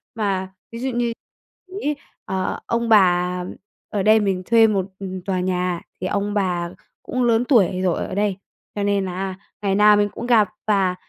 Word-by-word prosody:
Mà 190 -3 -2 0.2
ví 230 - -7
dụ 260 +2 -2
như 240 -1 -1 0.7
ấy, 295 0 0 0.3
ờ, 190 0 -2
ông 235 0 -1
bà 180 -3 +3 0.4
ở 205 -3 -1
đây 215 +2 +6
mình 195 -3 -1
thuê 225 +1 +5
một, 195 -4 0
ừm, 190 -1 -5
tòa 185 0 -2
nhà 180 -1 -1 0.2
thì 185 - -1
ông 205 +1 -1
bà 180 -4 0 0.3
cũng 255 0 -1
lớn 235 0 +3
tuổi 195 -8 +3
rồi 180 -2 +1
ở - - -6
đây, 200 -2 0 0.4
cho 205 - -1
nên 200 -1 +1
là 185 +1 -4 0.3
ngày 195 -2 +1
nào 210 +1 +6
mình 205 0 +2
cũng 235 - -7
gặp, 225 -5 +4 0.2
và 195 -3 +2
200 Hz, 185 wpm, -22 LUFS, 185-220 Hz, 0.7 s, đây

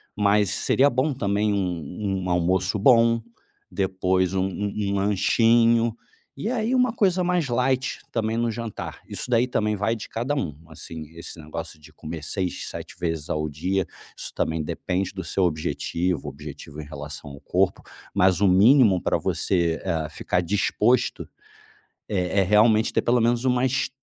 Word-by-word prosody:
Mas 105 -1 +3
seria 140 +2 +3
bom 135 +3 0
também 105 -3 0
um 95 +1 -2
um - - -4
almoço 90 +3 +1
bom, 115 0 +5 0.5
depois 95 -1 0
um 95 0 +1
um 100 +1 -3 0.2
um - - 0
lanchinho. 115 +3 +3 0.4
E - - -3
aí 235 0 0
uma 250 -2 +3
coisa 185 -5 +2
mais 175 -5 0
light 125 +2 0
também 110 -1 -1
no 120 0 +1
jantar. 115 -1 -6
Isso - - -6
daí 120 0 +3
também 105 -3 0
vai 105 +3 0
de 110 - -8
cada 120 +5 -2
um. 85 - -2
Assim, 80 0 -8
esse 85 - -9
negócio 75 0 -7
de 75 0 -17
comer 80 0 -7
6, 90 +3 -3
7 - - -8
vezes 80 -3 -3
ao 75 0 -1
dia, 90 +6 -1 0.3
isso - - -7
também 80 0 -1
depende 90 +4 -2
do 95 -1 -5
seu 95 - -1
objetivo, 85 +1 -2
objetivo 75 +1 -9
em - - -9
relação 75 0 -8
ao 70 - -10
corpo. - - 0 0.3
Mas 95 0 +3
o 100 - +5
mínimo 100 +1 +6
pra - - +1
você, 85 -3 0
eh, 80 -4 -2
ficar 90 +3 -1
disposto 105 +6 +1 0.8
eh 95 -1 0
eh, - - +2
realmente 110 +3 +4
ter - - +2
pelo 125 +1 +3
menos 120 +1 +1
umas 130 +1 +1
100 Hz, 160 wpm, -24 LUFS, 90-115 Hz, 0.8 s, mínimo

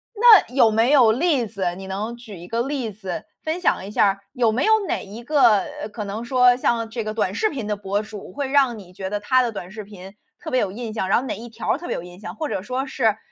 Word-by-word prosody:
那 430 - +7
有 235 -4 +5
没 225 +5 +3
有 245 -6 +6
例 280 -3 +1
子， 190 -4 -3
你 190 0 -8
能 210 +5 -4
举 225 -5 -11
一 175 - -11
个 230 +4 -1
例 260 -7 -3
子， 190 -3 -6 0.2
分 320 +3 -3
享 190 - +1
一 205 - -8
下， 195 -2 +2
有 235 -4 +2
没 255 +5 0
有 440 - +5
哪 - - -1
一 215 +4 -10
个， 245 -7 +4 0.2
呃， 210 - -4
可 210 0 -6
能 210 +4 -5
说 250 0 +4
像 230 -2 0
这 230 -1 -4
个 215 - -3
短 205 -4 -1
视 435 - +1
频 250 -7 -5
的 210 -1 -1
博 200 +1 -2
主， 210 -3 -10
会 275 +1 -3
让 270 -5 +3
你 185 -3 -12
觉 190 0 -6
得 205 0 -2
他 255 +4 +3
的 240 -2 -1
短 180 -2 -7
视 215 -1 -7
频 195 -1 -12 0.3
特 - - -7
别 255 - +2
有 190 - -1
印 225 -1 -6
象， 190 -4 -2
然 195 - +3
后 250 - -2
哪 - - -2
一 235 - -9
条 230 +3 -2
特 345 - -8
别 - - -2
有 - - -5
印 180 +1 -12
象， 185 -2 -8
或 310 - -3
者 190 - -3
说 255 +5 -3
是， 225 -6 +1
225 Hz, 295 characters per minute, -22 LUFS, 200-255 Hz, 0.3 s, 那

